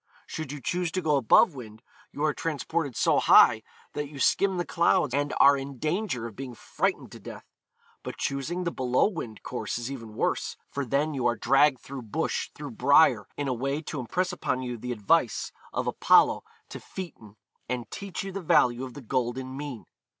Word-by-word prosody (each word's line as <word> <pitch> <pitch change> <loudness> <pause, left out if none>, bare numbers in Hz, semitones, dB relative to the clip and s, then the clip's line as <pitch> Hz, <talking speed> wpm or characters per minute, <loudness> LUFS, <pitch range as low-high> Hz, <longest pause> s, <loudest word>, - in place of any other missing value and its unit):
Should 155 -3 -6
you 145 - -6
choose 175 +5 -2
to 185 - -1
go 150 -2 +2
above 135 +5 +5
wind, 110 -4 -11 0.3
you 145 - -4
are 155 -1 +2
transported 155 -2 -2
so - - +3
high - - +6 0.3
that 145 -1 -4
you 145 - -11
skim 190 +6 +2
the 175 - -1
clouds 170 -6 +2
and 145 +1 0
are 140 - +7
in 135 0 -6
danger 155 - -2
of 115 -3 -8
being 130 -2 -7
frightened - - -2
to - - -10
death. - - -10 0.6
But - - -7
choosing 140 +7 -2
the 170 - -1
below 125 +2 +2
wind 125 - -7
course 125 - -4
is 120 +2 -5
even 115 -5 -8
worse, - - -1
for 140 -1 -3
then 145 +5 0
you 130 -3 0
are 120 - +1
dragged 135 +2 +3
through 135 -1 -7
bush, 110 -4 -2
through - - -7
briar, - - +4
in 145 - -2
a 130 - 0
way 135 +4 -2
to 150 -1 -5
impress 180 +9 -1
upon 130 -7 -2
you 125 -1 -4
the 125 +2 -6
advice 120 - +1 0.2
of - - -2
Apollo - - +4 0.3
to - - -7
Phaeton, 125 - -9 0.3
and 125 -3 -3
teach 200 -2 -5
you 195 - -5
the 195 +1 -5
value 125 -6 +3
of 130 -2 -8
the 145 - -8
golden 130 +2 -2
mean. 140 -4 -6
135 Hz, 195 wpm, -27 LUFS, 125-155 Hz, 0.6 s, are